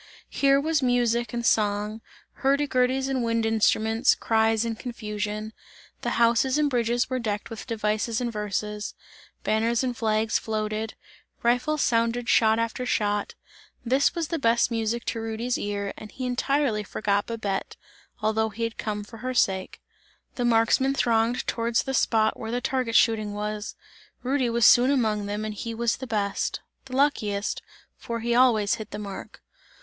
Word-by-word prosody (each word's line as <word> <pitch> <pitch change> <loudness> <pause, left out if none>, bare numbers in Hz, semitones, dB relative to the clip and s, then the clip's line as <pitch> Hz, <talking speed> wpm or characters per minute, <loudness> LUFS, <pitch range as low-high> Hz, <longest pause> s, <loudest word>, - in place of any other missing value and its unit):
Here 275 0 +3
was 310 0 +1
music 240 -2 +1
and 235 0 -3
song, 210 0 +1 0.4
hurdy 280 +2 +3
gurdys 260 +1 +1
and 265 -2 -1
wind 230 -1 0
instruments, 225 +2 +3
cries 225 0 +2
and 225 -1 -3
confusion. 215 -2 -4 0.5
The - - -2
houses 235 +4 +3
and 295 -1 +2
bridges 240 0 +1
were 255 0 -2
decked 210 -1 -3
with 225 - -7
devices 215 0 -1
and 240 -2 -2
verses; 210 0 -3 0.5
banners 230 +3 +1
and 250 -1 -1
flags 220 -1 +1
floated, 215 0 -3 0.5
rifles 250 +6 +2
sounded 230 +1 +1
shot 220 -1 +4
after 230 +2 -2
shot; 205 -4 -1 0.5
this 265 +8 +2
was 330 -3 -2
the 330 - -1
best 235 -1 +2
music 230 +1 -1
to 225 - -2
Rudy's 225 +2 -2
ear 200 -1 -3
and 215 - -10
he 260 - -5
entirely 250 -2 0
forgot 205 0 -1
Babette, 210 -4 -3 0.5
although 220 +1 +1
he 225 +2 -5
had 230 -1 -3
come 210 -1 -3
for 225 +2 -12
her 255 +2 -4
sake. 190 -5 0 0.5
The 245 - -3
marksmen 240 +4 +3
thronged 230 -1 +1
towards 230 0 0
the 270 - -3
spot 220 -3 +2
where 225 - -5
the 245 +2 -1
target 250 -2 -1
shooting 215 -2 +3
was; 210 0 -4 0.5
Rudy 260 -1 +1
was 235 0 +2
soon 245 +2 +7
among 215 -7 +1
them 210 +1 -3
and 215 - -3
he 230 +2 -5
was 235 0 0
the 260 - -7
best, 205 -4 -1 0.3
the 255 -1 -7
luckiest, 215 -8 0 0.4
for 230 -1 -5
he 235 +1 0
always 235 -5 +4
hit 215 -2 -5
the 210 - -6
mark. 200 -2 -8
230 Hz, 165 wpm, -26 LUFS, 215-245 Hz, 0.5 s, soon